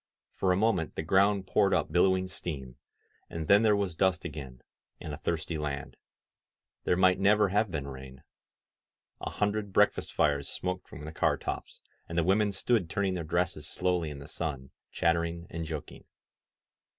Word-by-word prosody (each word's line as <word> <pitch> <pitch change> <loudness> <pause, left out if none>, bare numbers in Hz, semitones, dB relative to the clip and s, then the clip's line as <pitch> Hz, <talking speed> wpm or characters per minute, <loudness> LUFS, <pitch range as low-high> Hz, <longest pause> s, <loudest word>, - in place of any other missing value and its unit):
For 95 - +1
a 90 - +3
moment 100 -6 +1
the - - -2
ground 95 +3 +3
poured 100 +1 +3
up 80 -4 0
billowing 95 +2 +3
steam, 70 -9 -6 0.5
and 80 -2 -5
then 100 +4 +7
there 110 -2 +4
was 100 -4 -1
dust 95 0 +1
again, 65 -4 -7 0.4
and 75 - -6
a - - -5
thirsty 80 0 -2
land. 70 -2 -4 0.9
There 90 - +2
might 95 0 +4
never 105 +1 +4
have 105 +2 +2
been 75 -5 -4
rain. 65 -1 -10 1.0
A - - -4
hundred 105 0 -1
breakfast 105 +2 +2
fires 70 -2 +1
smoked 90 0 -4
from 75 +2 -9
the 80 - -6
car 80 - +1
tops, - - -6 0.3
and 85 - -4
the 85 - +4
women 100 +4 +3
stood 100 -2 +1
turning 100 -3 0
their 90 -2 -3
dresses 85 +2 -1
slowly 90 -3 0
in 75 - -7
the 70 +1 -10
sun, 75 -5 -4 0.2
chattering 85 0 0
and 85 0 -4
joking. 75 -3 -7
85 Hz, 170 wpm, -30 LUFS, 75-95 Hz, 1.0 s, then